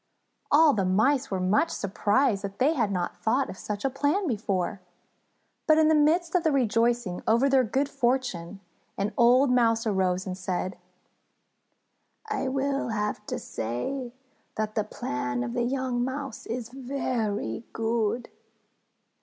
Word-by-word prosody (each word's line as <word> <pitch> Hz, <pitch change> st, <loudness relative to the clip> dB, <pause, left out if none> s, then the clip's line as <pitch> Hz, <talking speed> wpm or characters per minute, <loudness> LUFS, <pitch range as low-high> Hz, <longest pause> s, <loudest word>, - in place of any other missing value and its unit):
All 300 Hz, 0 st, +6 dB
the 200 Hz, -, 0 dB
Mice 255 Hz, +9 st, +2 dB
were 190 Hz, -, -1 dB
much 200 Hz, -, +2 dB
surprised 205 Hz, +2 st, +1 dB
that 200 Hz, 0 st, -5 dB
they 285 Hz, +5 st, +3 dB
had 230 Hz, -9 st, 0 dB
not 180 Hz, -2 st, -2 dB
thought 255 Hz, +5 st, +1 dB
of 185 Hz, -, -10 dB
such 210 Hz, +3 st, -4 dB
a -, -, +3 dB
plan 290 Hz, +9 st, 0 dB
before. 200 Hz, -, -2 dB, 0.9 s
But 310 Hz, -1 st, +6 dB
in 315 Hz, 0 st, +5 dB
the -, -, +5 dB
midst 325 Hz, +3 st, +3 dB
of 360 Hz, -2 st, +2 dB
the 320 Hz, -, +3 dB
rejoicing 235 Hz, -6 st, +1 dB
over 235 Hz, +5 st, +4 dB
their 270 Hz, -1 st, +4 dB
good 265 Hz, +5 st, 0 dB
fortune, 240 Hz, -9 st, -1 dB, 0.4 s
an 200 Hz, +1 st, -1 dB
old 250 Hz, +3 st, +5 dB
Mouse 230 Hz, -2 st, +3 dB
arose 185 Hz, -3 st, 0 dB
and 185 Hz, -, -4 dB
said: 185 Hz, 0 st, -3 dB, 1.5 s
"I 430 Hz, -10 st, -2 dB
will 275 Hz, 0 st, -1 dB, 0.5 s
say 235 Hz, -, -4 dB, 0.4 s
that 215 Hz, 0 st, -2 dB
the 215 Hz, -, 0 dB
plan 125 Hz, -10 st, -3 dB
of 120 Hz, -1 st, -4 dB
the -, -, 0 dB
young 250 Hz, 0 st, -1 dB
Mouse 265 Hz, -1 st, -5 dB
is 235 Hz, 0 st, -4 dB
very 245 Hz, -, -3 dB
good. 225 Hz, +1 st, -1 dB
235 Hz, 145 wpm, -27 LUFS, 200-270 Hz, 1.5 s, All